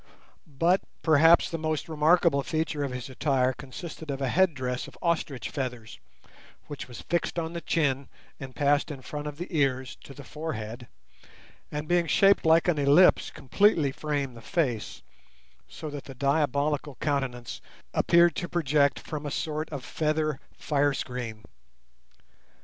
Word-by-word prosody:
But 165 Hz, +6 st, +2 dB, 0.2 s
perhaps 160 Hz, +1 st, +6 dB
the 165 Hz, -, -4 dB
most 155 Hz, -1 st, -2 dB
remarkable 160 Hz, -1 st, +3 dB
feature 155 Hz, 0 st, -2 dB
of 140 Hz, -, -3 dB
his 125 Hz, -2 st, -5 dB
attire 130 Hz, -1 st, +1 dB
consisted 155 Hz, +4 st, -9 dB
of 135 Hz, -1 st, -3 dB
a 135 Hz, -2 st, -1 dB
headdress 130 Hz, -8 st, +1 dB
of -, -, -14 dB
ostrich 160 Hz, -6 st, -1 dB
feathers, 125 Hz, -5 st, -5 dB, 0.7 s
which 145 Hz, -, -7 dB
was 125 Hz, -, -9 dB
fixed 170 Hz, +1 st, -1 dB
on 165 Hz, 0 st, -2 dB
the 170 Hz, -, -4 dB
chin, 140 Hz, -6 st, 0 dB, 0.3 s
and 135 Hz, -2 st, -9 dB
passed 145 Hz, 0 st, +2 dB
in 135 Hz, -3 st, -7 dB
front 150 Hz, 0 st, -5 dB
of 145 Hz, -1 st, -6 dB
the 175 Hz, -, -4 dB
ears 130 Hz, -3 st, 0 dB
to 135 Hz, -, -13 dB
the 140 Hz, -, -10 dB
forehead, 120 Hz, -6 st, -6 dB, 0.8 s
and, 150 Hz, +1 st, -4 dB
being 175 Hz, 0 st, +2 dB
shaped 195 Hz, 0 st, +4 dB
like 160 Hz, +1 st, +5 dB
an 165 Hz, -4 st, +2 dB
ellipse, 145 Hz, +6 st, +5 dB
completely 155 Hz, -, +2 dB
framed 140 Hz, -3 st, -3 dB
the 115 Hz, -, -11 dB
face, 125 Hz, -7 st, -2 dB, 0.6 s
so 150 Hz, -, -8 dB
that 145 Hz, -1 st, -7 dB
the 135 Hz, -, -10 dB
diabolical 145 Hz, +1 st, 0 dB
countenance 135 Hz, -5 st, -3 dB, 0.3 s
appeared 170 Hz, 0 st, +4 dB
to 175 Hz, -, -3 dB
project 145 Hz, -4 st, +2 dB
from 150 Hz, -2 st, -6 dB
a -, -, -2 dB
sort 155 Hz, +2 st, -3 dB
of 140 Hz, -4 st, -6 dB
feather 155 Hz, -2 st, -1 dB, 0.2 s
fire 145 Hz, -1 st, +1 dB
screen. 120 Hz, -5 st, -5 dB
145 Hz, 150 wpm, -27 LUFS, 135-160 Hz, 0.8 s, perhaps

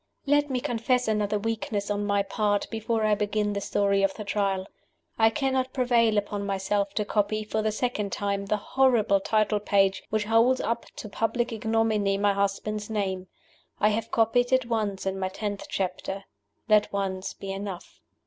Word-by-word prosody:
LET 290 Hz, +1 st, +3 dB
me 255 Hz, -2 st, 0 dB
confess 245 Hz, +1 st, 0 dB
another 210 Hz, -1 st, +1 dB
weakness, 210 Hz, -1 st, -2 dB
on 205 Hz, 0 st, -1 dB
my 200 Hz, -1 st, +2 dB
part, 205 Hz, 0 st, 0 dB
before 225 Hz, 0 st, -1 dB
I 215 Hz, -, +3 dB
begin 210 Hz, 0 st, 0 dB
the 200 Hz, -, -2 dB
Story 200 Hz, 0 st, +1 dB
of 195 Hz, -1 st, +1 dB
the 215 Hz, -, -6 dB
Trial. 200 Hz, -2 st, -1 dB, 0.5 s
I 225 Hz, 0 st, +6 dB
cannot 260 Hz, +1 st, -1 dB
prevail 235 Hz, -4 st, +3 dB
upon 205 Hz, 0 st, -1 dB
myself 200 Hz, 0 st, -1 dB
to 210 Hz, -, 0 dB
copy, 215 Hz, +1 st, 0 dB
for 215 Hz, +1 st, -2 dB
the 215 Hz, 0 st, 0 dB
second 215 Hz, -3 st, -2 dB
time, 200 Hz, -1 st, -2 dB
the 210 Hz, -, +1 dB
horrible 225 Hz, -3 st, +3 dB
title 215 Hz, +1 st, +1 dB
page 195 Hz, -1 st, +2 dB
which 215 Hz, 0 st, 0 dB
holds 230 Hz, +4 st, +3 dB
up 230 Hz, +1 st, -2 dB
to -, -, -7 dB
public 235 Hz, +3 st, -1 dB
ignominy 220 Hz, -3 st, +1 dB
my 200 Hz, 0 st, +2 dB
husband's 200 Hz, +2 st, -2 dB
name. 190 Hz, -4 st, -2 dB, 0.5 s
I 210 Hz, -, +4 dB
have 225 Hz, +1 st, -2 dB
copied 245 Hz, +2 st, +2 dB
it 260 Hz, -2 st, +3 dB
once 215 Hz, -5 st, -2 dB
in 190 Hz, 0 st, -2 dB
my 185 Hz, -1 st, -1 dB
tenth 205 Hz, +1 st, -5 dB
chapter. 190 Hz, +1 st, -3 dB, 0.4 s
Let 215 Hz, -2 st, +4 dB
once 190 Hz, -1 st, -3 dB
be 195 Hz, -, -6 dB
enough. 195 Hz, -2 st, -7 dB
210 Hz, 175 wpm, -27 LUFS, 200-225 Hz, 0.5 s, I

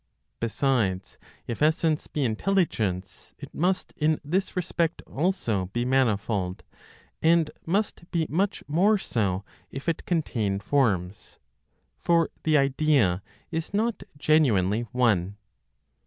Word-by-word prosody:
Besides, 115 Hz, -6 st, 0 dB, 0.3 s
if 120 Hz, -, -5 dB
essence 155 Hz, 0 st, +2 dB
be 145 Hz, -3 st, -1 dB
intelligence, 110 Hz, -, -1 dB
it -, -, -11 dB
must 185 Hz, +3 st, 0 dB
in 155 Hz, 0 st, +1 dB
this 185 Hz, +6 st, -1 dB
respect 170 Hz, -2 st, -1 dB
also 130 Hz, -, -1 dB
be 120 Hz, 0 st, 0 dB
manifold, 105 Hz, -7 st, 0 dB, 0.6 s
and 165 Hz, -1 st, +3 dB, 0.2 s
must 195 Hz, -1 st, -1 dB
be 165 Hz, -3 st, 0 dB
much 195 Hz, +6 st, -1 dB
more 190 Hz, +9 st, +3 dB
so 100 Hz, -, -1 dB, 0.2 s
if 135 Hz, +4 st, -8 dB
it 165 Hz, -, -1 dB
contain 115 Hz, -, 0 dB
forms; 100 Hz, -6 st, 0 dB, 0.6 s
for 170 Hz, -1 st, +2 dB
the 155 Hz, -1 st, +3 dB
idea 135 Hz, -, +2 dB, 0.3 s
is 165 Hz, +4 st, -3 dB
not 225 Hz, +2 st, 0 dB, 0.2 s
genuinely 120 Hz, -8 st, +2 dB
one. 105 Hz, -6 st, +1 dB
140 Hz, 110 wpm, -26 LUFS, 105-165 Hz, 0.6 s, and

